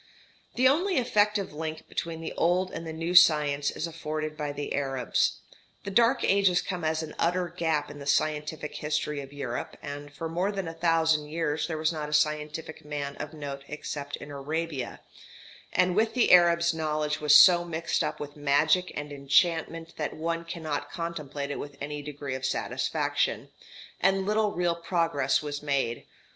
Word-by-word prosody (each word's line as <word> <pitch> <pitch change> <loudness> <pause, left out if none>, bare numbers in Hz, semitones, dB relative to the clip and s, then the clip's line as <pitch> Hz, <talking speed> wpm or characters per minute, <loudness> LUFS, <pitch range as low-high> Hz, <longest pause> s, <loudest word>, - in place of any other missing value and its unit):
The 255 +1 +5
only 355 +7 +2
effective 210 - +2
link 155 +1 -5
between 165 -1 -4
the 160 - -5
old 180 +2 +1
and 165 0 -6
the - - -4
new 165 +2 -3
science 150 -5 +5
is - - -3
afforded 155 -2 -4
by 150 -1 -3
the 145 0 -4
Arabs. 135 -4 0 0.4
The 200 - -5
dark 230 +3 +4
ages 195 -2 +4
come 180 -3 -4
as 160 0 0
an 155 - -7
utter 175 +1 +1
gap 160 -3 -1
in 145 - -10
the 140 - -8
scientific 150 +1 -1
history 150 -1 -2
of 135 0 -10
Europe, 135 -4 -5
and 145 0 -7
for 165 +3 -5
more 175 +5 -1
than 195 -4 -4
a 165 - -5
thousand 160 -2 +2
years 150 -1 -1
there 160 -2 -3
was 155 +1 +1
not 150 -2 -4
a - - -5
scientific 150 +1 -1
man 145 -1 -4
of - - -6
note 140 -2 -6
except 145 -1 -5
in 145 - -10
Arabia; 145 -1 -4 0.7
and 180 -1 +2
with 220 +3 +2
the 245 - +3
Arabs 170 -1 +6
knowledge 155 -1 -1
was 150 -1 +6
so 175 +3 +8
mixed 165 -1 -1
up 150 0 -3
with 145 0 -7
magic 150 +5 +2
and 145 0 -5
enchantment 165 +3 +1
that 150 - -3
one 165 +1 -2
cannot 160 -3 -4
contemplate 150 -4 -4
it - - -4
with 145 -1 -8
any 145 +1 -4
degree 145 -2 -6
of 130 0 -5
satisfaction, - - -1 0.5
and 195 0 +2
little 210 0 +2
real 175 -1 +1
progress 165 -5 0
was 145 -1 -4
made. 140 -5 -1
155 Hz, 175 wpm, -28 LUFS, 145-170 Hz, 0.7 s, so